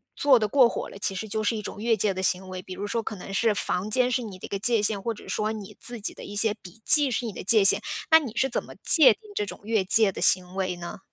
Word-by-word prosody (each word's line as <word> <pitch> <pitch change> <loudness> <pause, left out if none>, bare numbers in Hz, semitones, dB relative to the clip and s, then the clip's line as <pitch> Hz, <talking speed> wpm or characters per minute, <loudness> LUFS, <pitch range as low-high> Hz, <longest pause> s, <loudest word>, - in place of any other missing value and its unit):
做 275 -3 +4
得 215 - -1
过 250 +2 +4
火 - - -6
了， - - -12
其 195 - -2
实 220 +4 -6
就 215 +1 -4
是 220 +1 -1
一 215 - -5
种 205 - -8
越 225 0 0
界 200 0 0
的 190 - -5
行 190 0 -1
为？ 185 0 -8
比 185 - -10
如 200 - -6
说 230 +3 -3
可 215 - -7
能 195 +1 -10
是 220 +1 +1
房 190 0 -3
间 250 +2 +1
是 250 - -1
你 205 -5 -9
的 - - -10
一 - - -8
个 200 - -5
界 230 +1 +1
限， 210 -1 -1
或 230 +4 -3
者 210 - -15
说 215 0 -2
你 210 -3 -9
自 240 -2 -7
己 205 - -4
的 - - -12
一 205 - -10
些 210 +1 +1
笔 210 0 -15
记 295 -2 +7
是 245 0 -3
你 220 - -6
的 - - -9
界 210 +2 +4
限， 200 +1 +5 0.3
那 320 - +8
你 255 -8 -8
是 265 - +1
怎 255 - -3
么 - - -14
界 315 -5 +8
定 - - -28
这 - - -1
种 - - -10
越 220 -2 -1
界 200 +2 +3
的 - - -9
行 180 -1 +2
为 185 -1 -3
呢？ 175 +2 -9
210 Hz, 335 characters per minute, -24 LUFS, 195-230 Hz, 0.3 s, 那